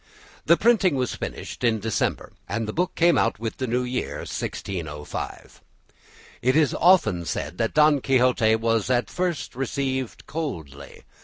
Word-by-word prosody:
The 170 +2 +6
printing 210 -8 +3
was 125 -2 -1
finished - - -6
in 115 -2 +2
December, 110 +1 -2 0.2
and 115 -1 -2
the 105 - -4
book 180 +2 -1
came 170 0 +4
out - - +1
with 115 +1 -5
the 130 - -2
new 125 +2 0
year, 125 0 -3
1605. 75 -6 -6 0.8
It 130 +2 +2
is 155 -3 +3
often 135 - +4
said 85 +2 -4
that 115 -1 -1
"Don 150 -2 +5
Quixote" 125 -4 +3
was 115 0 0
at 125 -1 +1
first 180 -8 -2
received 130 -1 -3
coldly. 80 - -6
125 Hz, 150 wpm, -24 LUFS, 110-150 Hz, 0.8 s, The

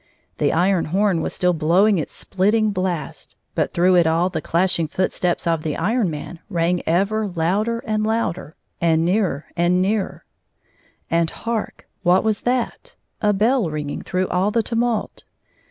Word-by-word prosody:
The - - +2
iron 180 +1 +2
horn 190 +1 +1
was - - -2
stiU 180 -1 +2
blowmg 180 +6 +3
its 155 - -6
sphttmg 210 +3 +2
blast; 180 -6 -4 0.2
but - - 0
through 180 +2 +3
it 170 -2 +4
all 165 +3 +2
the - - -3
clashing 170 -1 +1
foot 185 +5 -1
steps 175 -1 -1
of 165 -2 +1
the 155 -2 -3
Iron 215 +3 +1
Man 155 +2 -7
rang 175 -1 0
ever 200 +6 +1
louder 200 +7 -1
and 215 -2 0
louder, 215 -7 -2 0.3
and 165 -1 +3
nearer 180 -6 0
and 175 +1 +2
nearer. 195 +1 -1 0.9
And 165 -1 +2
hark! 230 +2 -4
What 180 0 +3
was 215 -2 0
that 255 - -2 0.2
1 210 - +1
A - - +4
bell 220 0 +2
ringing 150 -1 -4
through 185 0 -1
all 185 +3 +1
the 225 +1 +1
tumult. 230 -1 -1
185 Hz, 165 wpm, -21 LUFS, 170-215 Hz, 0.9 s, it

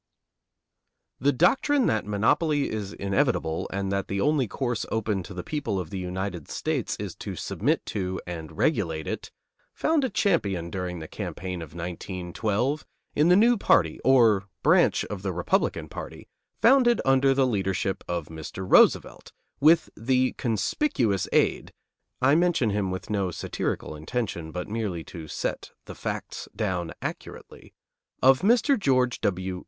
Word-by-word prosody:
The 140 +2 +3
doctrine 260 - +3
that 110 -2 0
monopoly 140 +8 +1
is 105 -2 -4
inevitable 100 - 0
and 95 0 -2
that 100 0 -1
the 100 - -2
only 145 +1 +2
course 120 +2 -2
open 110 -3 -1
to 90 - -9
the 90 - -5
people 115 -9 -2
of 85 -3 -6
the 95 - -4
United 90 -2 -4
States - - -2
is - - -6
to - - -6
submit - - -1
to 95 -2 -2
and 80 -2 -7
regulate 85 - 0
it - - -5 0.5
found 315 -2 +1
a 260 - +1
champion 100 - 0
during 90 -2 -4
the 80 -1 -7
campaign 90 +1 -5
of 80 -1 -10
1912 95 - -2 0.3
in 150 +2 +3
the 180 - +7
new 235 +4 +5
party, 80 - +3
or 115 -7 +5 0.2
branch - - +4
of 105 -3 -6
the 95 -1 -2
Republican 90 0 0
party, - - -9 0.3
founded 245 -1 +5
under 135 0 +4
the 135 -1 +3
leadership 95 -4 -1
of 85 -2 -2
Mr. 80 +4 -7
Roosevelt, - - +4 0.3
with 160 +4 +4
the 130 +2 +1
conspicuous 115 - 0
aid, - - +1 0.5
I 135 +2 +5
mention 165 -9 +2
him 100 -2 -1
with 95 +3 -5
no 100 -3 0
satirical 80 - -3
intention, 85 -1 -4
but 90 +1 -5
merely 105 -6 -3
to 80 -3 -7
set - - -4 0.2
the - - -8
facts - - -5
down 90 -6 -2
accurately, - - -8 0.5
of 130 0 +6
Mr. 240 +5 +3
George 130 -8 +1
W. 95 -1 -1
105 Hz, 150 wpm, -26 LUFS, 90-135 Hz, 0.5 s, the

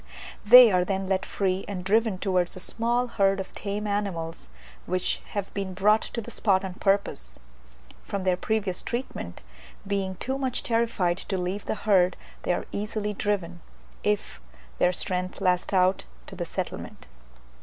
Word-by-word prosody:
They 240 +2 +10
are 180 -1 +3
then 195 +1 -2
let 190 -1 0
free 190 -1 0
and 190 -3 -4
driven 220 0 +2
towards 185 -2 0
a - - -7
small 235 +5 0
herd 195 -5 +2
of 190 - -6
tame 205 +1 -4
animals, 185 - -3 0.4
which 185 +1 0
have 200 -1 -3
been 195 -2 -4
brought 210 +3 +4
to 235 - -4
the - - -9
spot 195 -3 +2
on 185 - -5
purpose. 195 - 0 0.6
From 200 -2 -4
their 185 -1 +3
previous 195 -1 -1
treatment, 235 - -5 0.4
being 195 -1 -1
too 265 +8 -3
much 260 -2 -1
terrified 225 -7 +1
to 195 - -3
leave 185 +3 -3
the - - -1
herd, 185 -5 +3 0.2
they - - 0
are 175 - -1
easily 210 0 -2
driven, 185 -4 -2 0.4
if 200 - -1 0.4
their 180 - +4
strength 180 0 -2
last 180 -1 +1
out, 185 0 +3 0.2
to - - -10
the - - -3
settlement. - - -5
195 Hz, 160 wpm, -26 LUFS, 185-210 Hz, 0.6 s, They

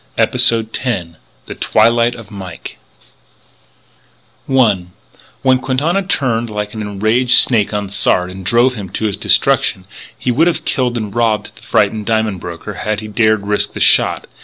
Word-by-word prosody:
EPISODE 115 -1 +2
TEN 90 -10 -3 0.3
THE - - -7
TWILIGHT 115 +2 +2
OF 115 -2 -12
MIKE 95 -4 -9 1.7
I 110 -9 +2 0.6
When 130 -1 +3
Quintana 140 +9 0
turned 125 -11 -1
like 105 -1 -5
an 110 - -5
enraged 110 +5 +1
snake 110 -5 +3
on 105 -1 -3
Sard 90 -2 +1
and 95 +1 -9
drove 120 +6 +3
him 100 -6 -7
to 110 - -2
his 105 -3 -1
destruction, 95 - +1 0.3
he 125 - -1
would 155 +8 +2
have 175 - -2
killed 125 -3 -1
and 105 -3 -5
robbed 115 -2 -1
the - - -18
frightened 105 -2 0
diamond 110 -4 0
broker 85 -1 -8
had 105 -1 -3
he 110 - -8
dared 110 -1 +1
risk 105 0 0
the - - -6
shot. - - +3
110 Hz, 160 wpm, -15 LUFS, 105-125 Hz, 1.7 s, When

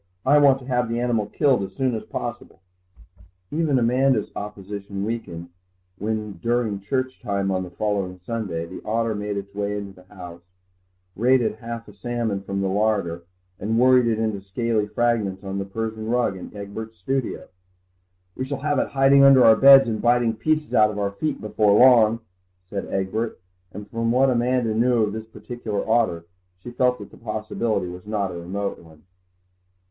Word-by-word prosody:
I 145 +3 +5
want 140 -2 +5
to 130 - -13
have 125 -2 0
the 115 +1 -1
animal 120 -4 0
killed 135 0 +2
as 95 -1 -5
soon 130 +4 0
as 110 - -3
possible." - - -6 0.9
Even 155 -3 +1
Amanda's 125 -1 +2
opposition 100 -1 -6
weakened 85 -7 -5 0.5
when, 105 -3 -3
during 115 -3 0
church 130 +6 -3
time 100 -4 -1
on 95 -1 0
the 90 - -6
following 95 -1 -2
Sunday, 100 -8 -3
the 90 +2 -9
otter 115 +1 0
made 105 0 -3
its 100 0 -7
way 105 0 -2
into 100 -1 -7
the 90 - -25
house, 90 -2 -10 0.7
raided 120 0 +2
half 115 0 -7
a 105 - -13
salmon 110 -1 -3
from 100 0 -3
the 95 - 0
larder 95 -4 0 0.3
and 110 +3 -1
worried 125 0 +5
it 115 -2 +1
into 110 -3 -2
scaly 105 +2 -1
fragments 105 -4 0
on 95 0 -4
the 95 - -3
Persian 110 +2 -4
rug 120 -4 +1
in 95 - -9
Egbert's 110 +2 -7
studio. 135 -2 -3 0.9
"We 130 - -3
shall 135 0 -4
have 145 -2 +1
it - - 0
hiding 135 0 +5
under 135 -2 +7
our 110 -1 +8
beds 135 +1 +8
and 110 -2 -2
biting 120 -1 +3
pieces 155 +5 -1
out 105 -1 +5
of 105 - -6
our 100 -1 -1
feet 150 +10 -3
before 105 -1 +2
long," 115 -3 +6 0.4
said 100 +2 -5
Egbert, 100 +4 -2 0.3
and 105 +1 -9
from 115 +2 -1
what 130 +2 +4
Amanda 120 -1 +1
knew 120 +1 +2
of 105 -1 -1
this 110 0 -6
particular 110 -3 -5
otter 110 -8 +1 0.3
she 105 +7 -10
felt 125 0 +1
that - - -11
the - - -15
possibility 110 -2 -2
was 90 +2 -9
not 100 -3 -1
a 85 -1 -7
remote 100 +3 -4
one. 80 -2 -18
110 Hz, 180 wpm, -23 LUFS, 100-120 Hz, 0.9 s, our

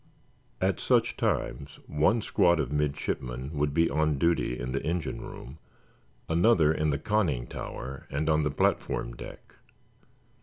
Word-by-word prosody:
At - - +1
such - - +2
times - - -2
one 80 +10 +2
squad 85 -2 +3
of 70 -4 -1
midshipmen 70 -3 -2
would 75 -1 0
be 85 +3 +3
on 75 0 +1
duty 85 -5 +1
in 60 +1 -4
the 70 - -1
engine 80 -5 -2
room, 70 +6 -9 0.7
another 85 -2 +4
in 80 -1 0
the 70 - +1
conning 85 - 0
tower 65 +2 -7
and 75 +3 -2
on 80 -1 +3
the 75 - +1
platform - - 0
deck. - - -11
75 Hz, 145 wpm, -28 LUFS, 70-80 Hz, 0.7 s, another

